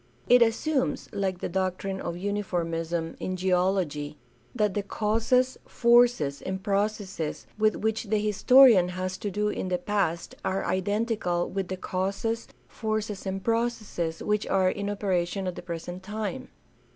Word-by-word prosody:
It 245 0 +6
assumes, 260 +5 +1
like 190 -3 -2
the - - -1
doctrine 190 +1 -2
of 170 - -3
uniformism 170 -4 -2
in 185 - -3
geology, 180 -5 0 0.4
that 210 -4 +1
the 205 - 0
causes, 225 +5 +1
forces, 235 - +3
and 190 0 -4
processes 200 -5 -2
with 215 0 +3
which 220 +1 -1
the 215 +1 +1
historian 210 -1 +6
has 185 0 -2
to 205 - -3
do 210 +2 0
in 190 - -3
the 180 -1 0
past 180 -3 -1
are 190 +1 -1
identical 195 -2 0
with 195 -1 -2
the 185 - -4
causes, 195 +6 -2 0.2
forces, 215 -3 -3
and 190 0 -3
processes 225 -8 -1
which 210 0 0
are 185 -1 +3
in 200 0 -3
operation 195 -2 -1
at 180 - -2
the - - -7
present 175 +1 -6
time. 215 +6 -4
195 Hz, 145 wpm, -27 LUFS, 180-215 Hz, 0.4 s, It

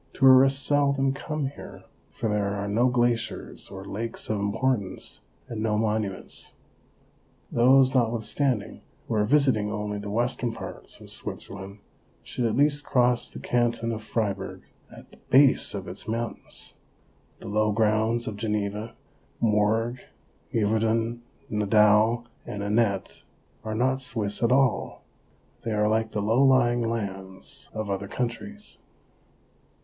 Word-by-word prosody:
Tourists 135 +1 +6
seldom 140 -2 +2
come 145 0 -3
here, 140 - -11 0.3
for 115 - -4
there 105 -1 0
are 100 0 -3
no 115 +5 +3
glaciers 120 -2 -1
or 95 0 -8
lakes 115 +2 -3
of 105 - 0
importance, 100 -1 -1 0.3
and 115 -2 -5
no 110 -1 +1
monuments. 105 -3 -2 1.0
Those, 130 +2 +5
notwithstanding, 120 -1 0 0.3
who - - -2
are 105 -1 +2
visiting 125 -5 +3
only 105 -1 -3
the 100 0 -6
western 120 +2 0
parts - - -9
of - - -9
Switzerland, 100 +1 -7 0.4
should 125 - -3
at 110 - -1
least 145 +1 +3
cross 125 -3 +2
the - - -10
canton 120 -1 0
of 110 -1 -4
Fribourg 100 -3 -3 0.3
at - - -14
the - - -17
base 135 -5 +5
of 95 -2 -5
its 90 +4 -8
mountains; 115 0 -4 0.6
the - - -10
low 110 +1 +1
grounds 110 +2 +1
of 105 -2 -5
Geneva, 105 +1 -2 0.4
Morges, 110 +3 +1 0.5
Yverdun, 115 +2 +1 0.3
Nidau 105 +2 +4 0.2
and 100 0 -5
Anet 100 -2 0 0.4
are 110 0 -3
not 130 +3 +1
Swiss 110 -5 0
at 115 0 +3
all; 135 -2 +1 0.6
they 115 - -2
are 105 0 +2
like 110 +1 +1
the 105 - -2
low 115 +6 +3
lying 120 -3 +4
lands 95 -4 -4
of 110 -2 -4
other 100 0 -3
countries. 125 - -5
115 Hz, 135 wpm, -26 LUFS, 105-125 Hz, 1.0 s, Tourists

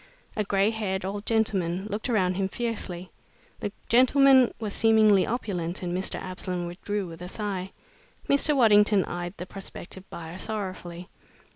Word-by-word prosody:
A 215 - 0
gray 200 +1 +2
haired 190 -4 -2
old 200 +2 -5
gentleman 195 -5 +1
looked 215 +4 -3
around 185 -6 +2
him 190 +1 -1
fiercely. 195 -6 -4 0.5
The 205 - -3 0.2
gentleman 260 +1 +6
was 215 -3 -4
seemingly 220 -3 +4
opulent 185 -7 -3
and 175 0 -2
Mr. 185 +1 -3
Absolom 185 -1 -4
withdrew 195 +3 -3
with 165 -1 -10
a 180 - -6
sigh. 195 -2 -4 0.6
Mr. 285 +2 +3
Waddington 210 -5 +5
eyed 175 +1 -5
the 180 - -6
prospective 190 0 -8
buyer 170 +2 -8
sorrowfully. 185 -4 -5
195 Hz, 145 wpm, -27 LUFS, 180-220 Hz, 0.6 s, gentleman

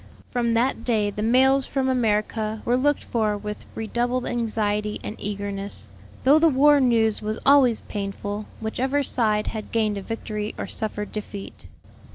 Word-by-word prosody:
From 235 -2 +1
that 245 +4 +1
day 215 -4 +1
the 210 - -5
mails 260 +4 +4
from 270 -1 -1
America 220 -3 0
were 240 - +2
looked 290 +3 +1
for 215 -3 0
with 210 0 -7
redoubled 240 +3 -1
anxiety 210 -3 -1
and 215 - -5
eagerness: 200 0 -5 0.3
though 285 +4 +6
the 325 +1 +5
war 290 +1 +5
news 230 -5 +2
was 215 +1 -2
always 270 -5 +5
painful, 205 +1 -5
whichever 260 +6 -1
side 215 -5 +1
had 215 -2 -6
gained 215 -3 +1
a - - -7
victory 215 0 -4
or - - -3
suffered 210 -1 -4
defeat. 205 -2 -7
220 Hz, 155 wpm, -24 LUFS, 210-250 Hz, 0.3 s, though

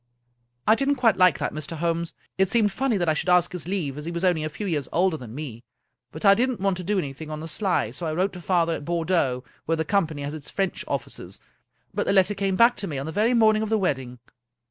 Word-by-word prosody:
I 215 - +6
didn't 275 +4 +1
quite 230 -6 +3
like 180 -5 +5
that, - - -2
Mr. 155 +2 -5
Holmes. 170 +1 -1 0.2
It 190 -1 +2
seemed 215 -2 +3
funny 240 +2 0
that 175 -2 0
I 155 - +4
should 170 +4 -2
ask 180 -1 +4
his 180 -2 -6
leave, 160 -8 -2
as 150 - -8
he - - -3
was 170 +1 -4
only 175 -4 +2
a 155 - -2
few 205 +7 -6
years 150 -8 -2
older 180 0 +2
than 125 -6 -9
me; 130 -6 -7 0.5
but 155 +8 -6
I 195 - +9
didn't 250 +3 0
want 195 -1 +1
to 180 - -5
do 205 +3 0
an)rthing 150 -2 -4
on 155 0 -5
the 160 - -6
sly, 190 +3 0
so 170 - -5
I 155 - -1
wrote 190 +3 0
to 180 - -8
father 170 -2 +1
at 155 - -5
Bordeaux, 165 -6 0 0.2
where 165 - +2
the 160 - -1
com 200 -1 +2
pany 150 -2 -7
has 145 +1 -4
its 155 -2 -7
French 195 -2 -2
offices, - - -4 0.5
but - - -1
the - - +3
letter 190 +1 +4
came 195 -1 -1
back 235 +4 +5
to 200 - -4
me 145 - -4
on 135 - -3
the 160 - -4
very 220 +7 +2
morning 215 -2 +4
of 220 - -2
the 220 - +2
wedding." 135 -10 -2
175 Hz, 265 wpm, -25 LUFS, 155-200 Hz, 0.5 s, I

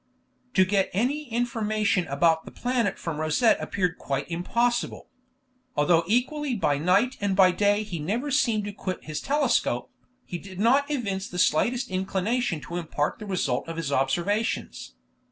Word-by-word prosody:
To 190 - +6
get 195 0 +1
any 265 +8 -1
information 215 -6 0
about 160 +3 +2
the - - -8
planet 240 -5 -1
from 160 -3 -4
Rosette 155 +9 +3
appeared 180 -3 -1
quite 135 -1 -3
impossible. 235 +8 -1 0.7
Although 165 +3 +3
equally 255 +5 0
by 145 -9 +1
night 195 - +2
and 200 -1 +1
by 185 -1 +6
day 205 +3 +2
he 185 -6 -5
never 230 - -2
seemed 230 -7 +2
to 205 - -5
quit 185 -2 -5
his 155 -1 -5
telescope, 285 -2 +1 0.3
he 175 - -5
did 190 0 -10
not 270 +7 +3
evince 200 -9 -2
the 180 - -8
slightest 235 - +2
inclination 190 0 -1
to 170 +7 -6
impart 155 -3 -2
the 215 - -8
result 170 -10 -1
of 165 0 -6
his 155 -4 -3
observations. 175 - -1
195 Hz, 155 wpm, -26 LUFS, 170-235 Hz, 0.7 s, To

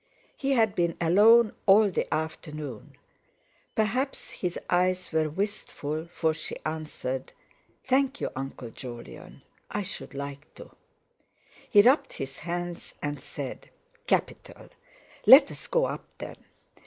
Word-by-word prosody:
He 275 0 0
had 220 -5 +3
been 170 -1 0
alone 210 +6 +6
all 200 +1 +6
the - - -2
afternoon. 155 -5 -5 0.8
Perhaps 245 +6 -1
his 180 -2 -3
eyes 180 0 +1
were 160 -1 +1
wistful, 160 -4 -3
for 160 -2 0
she 155 - -6
answered: 155 -4 -4 0.5
"Thank 270 +1 +1
you, - - -2
Uncle 130 -3 -6
Jolyon. 120 -1 -10 0.3
I 205 - -2
should 185 -6 -7
like 140 +1 -7
to." - - -12 1.0
He 205 -3 +7
rubbed 260 +6 +4
his 135 0 -6
hands, 175 +1 -5
and 145 -2 -3
said: 140 -1 -7 0.4
"Capital! - - -2 0.6
Let's - - +8
go - - +2
up, - - -5
then!" - - -8
170 Hz, 120 wpm, -27 LUFS, 145-205 Hz, 1.0 s, Let's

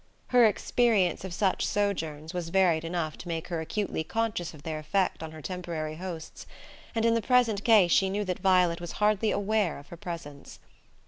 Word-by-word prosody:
Her 245 -2 +6
experience 210 -4 +1
of 190 - -6
such 190 +2 0
sojourns 160 -7 -2
was 175 -2 -3
varied 175 -3 +3
enough 165 -2 -3
to - - -9
make 165 -1 -4
her 170 -2 -2
acutely 190 0 -2
conscious 220 -3 -2
of 150 -3 -14
their 155 -1 -4
effect 185 +5 0
on 160 -1 -6
her 155 -1 -11
temporary 165 -4 -4
hosts; 170 -3 -7 0.5
and 225 0 +1
in 230 - +4
the 230 - +1
present 230 -4 +2
case 210 -7 +5
she 190 +2 +4
knew 205 +2 -1
that 180 -2 -3
Violet 180 -3 +3
was 175 - -6
hardly 210 +1 +2
aware 205 -4 0
of 140 - -13
her 170 - -9
presence. 165 -5 -8
180 Hz, 190 wpm, -28 LUFS, 160-205 Hz, 0.5 s, Her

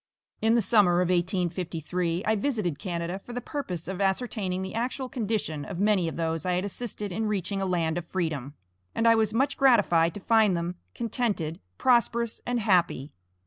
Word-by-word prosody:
In 225 +1 +4
the 235 - +3
summer 190 -4 +4
of 180 - +1
1853, 175 -1 -1
I 220 - +3
visited 205 - -1
Canada 175 0 -3
for 240 - -10
the 245 - -2
purpose 220 - -5
of 190 +1 -4
ascertaining 195 -2 -1
the 190 - -6
actual 255 +3 -2
condition 215 - -2
of 170 - -6
many 200 -3 +2
of 165 - -4
those 165 -1 -1
I 180 - 0
had 180 +2 0
assisted 205 -1 -5
in 220 +5 -1
reaching 200 -1 -1
a 195 - 0
land 170 -2 0
of 170 - -10
freedom; 155 -7 -3 0.4
and 230 - +2
I 230 - +8
was 220 -2 +2
much 270 +5 +1
gratified 195 - +4
to - - -5
find 215 -3 +3
them 170 +1 -2 0.2
contented, 215 -9 -2 0.2
prosperous, 235 -2 +2
and 245 0 +1
happy. 175 - +2
190 Hz, 185 wpm, -27 LUFS, 175-225 Hz, 0.4 s, I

